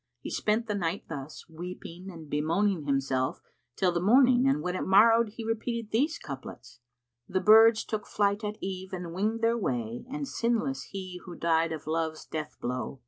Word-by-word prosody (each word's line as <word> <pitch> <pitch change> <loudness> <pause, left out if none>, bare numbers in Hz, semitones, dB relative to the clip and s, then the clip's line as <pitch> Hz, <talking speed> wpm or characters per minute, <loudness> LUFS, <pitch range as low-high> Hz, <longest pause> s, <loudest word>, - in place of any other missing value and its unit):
He - - -7
spent 215 +2 0
the 215 - -2
night 180 -2 -2
thus, 140 +1 -7
weeping 175 +2 -8
and 165 -4 -10
bemoaning 160 +4 0
himself, 135 -2 0 0.4
till 185 -2 +2
the 170 0 -1
morning, 250 +5 +5
and 275 +2 +2
when 180 0 -2
it - - -2
morrowed 225 +3 +5
he 225 0 -7
repeated 225 0 -3
these 295 +9 +1
couplets, 125 -3 -9 0.5
"The 185 - +1
birds 220 +3 +7
took 215 -2 -4
flight 205 +1 +1
at 210 0 -3
eve 190 0 -5
and 175 -2 -5
winged 215 +5 -1
their 230 +1 +2
way; 120 - -2
* - - -20
And 285 0 -3
sinless 240 +2 -1
he 185 -2 -7
who 175 -2 -8
died 165 -1 +1
of 160 -2 -5
Love's 160 0 -2
death 155 -1 -5
blow. 125 +2 -4
190 Hz, 185 wpm, -29 LUFS, 160-225 Hz, 0.5 s, birds